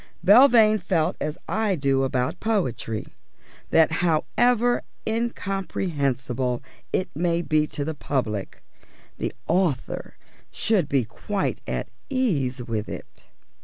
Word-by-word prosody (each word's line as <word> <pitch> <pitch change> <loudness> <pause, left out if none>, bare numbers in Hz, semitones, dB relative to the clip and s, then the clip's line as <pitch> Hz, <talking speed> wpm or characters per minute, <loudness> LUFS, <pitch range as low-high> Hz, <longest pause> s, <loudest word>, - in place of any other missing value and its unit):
Belvane 220 -1 +7
felt 170 -3 0
as 150 - -2
I 210 +1 +1
do 135 -3 +1
about 130 +5 -1
poetry: 150 - -1 0.6
that 160 -1 +5
however 240 +9 +2 0.2
incomprehensible 150 - -1 0.3
it 185 - 0
may 170 +2 0
be 155 -1 +2
to 145 - -4
the 160 - -2
public, 115 -9 -3 0.6
the - - -1 0.2
author 170 -6 0 0.3
should 190 -10 +1
be 135 -4 +2
quite 200 - -3
at - - -2 0.2
ease 145 - 0
with 110 -3 -3
it. - - -10
160 Hz, 110 wpm, -25 LUFS, 135-205 Hz, 0.6 s, Belvane